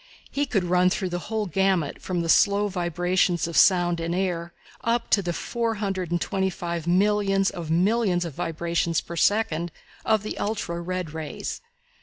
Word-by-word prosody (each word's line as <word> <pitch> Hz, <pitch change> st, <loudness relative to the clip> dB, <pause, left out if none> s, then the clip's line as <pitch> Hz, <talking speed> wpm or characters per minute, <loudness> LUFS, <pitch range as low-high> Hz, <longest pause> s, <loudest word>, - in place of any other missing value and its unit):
He 285 Hz, 0 st, 0 dB
could 195 Hz, -8 st, +1 dB
run 180 Hz, +1 st, +3 dB
through 185 Hz, 0 st, -2 dB
the 175 Hz, 0 st, -2 dB
whole 220 Hz, -1 st, -1 dB
gamut 190 Hz, -4 st, 0 dB
from 180 Hz, -2 st, -2 dB
the -, -, -3 dB
slow 200 Hz, +4 st, +4 dB
vibrations 175 Hz, -1 st, 0 dB
of 170 Hz, -, -6 dB
sound 175 Hz, -2 st, +4 dB
in 165 Hz, +1 st, -2 dB
air 175 Hz, -2 st, -2 dB, 0.3 s
up 230 Hz, 0 st, 0 dB
to 200 Hz, -, +5 dB
the 175 Hz, -2 st, -2 dB
four 230 Hz, +7 st, -2 dB
hundred 195 Hz, -4 st, -2 dB
and 175 Hz, 0 st, 0 dB
twenty 190 Hz, +2 st, 0 dB
five 170 Hz, -2 st, -4 dB
millions 195 Hz, +1 st, +2 dB
of 170 Hz, -3 st, -6 dB
millions 180 Hz, +1 st, +2 dB
of 165 Hz, -, -5 dB
vibrations 170 Hz, +1 st, -1 dB
per 170 Hz, -, -8 dB
second 175 Hz, -3 st, +1 dB, 0.3 s
of 220 Hz, -2 st, +2 dB
the 215 Hz, -, -5 dB
ultra 195 Hz, -5 st, -2 dB
red 180 Hz, -2 st, -4 dB
rays. 160 Hz, -2 st, -5 dB
180 Hz, 175 wpm, -25 LUFS, 170-200 Hz, 0.3 s, to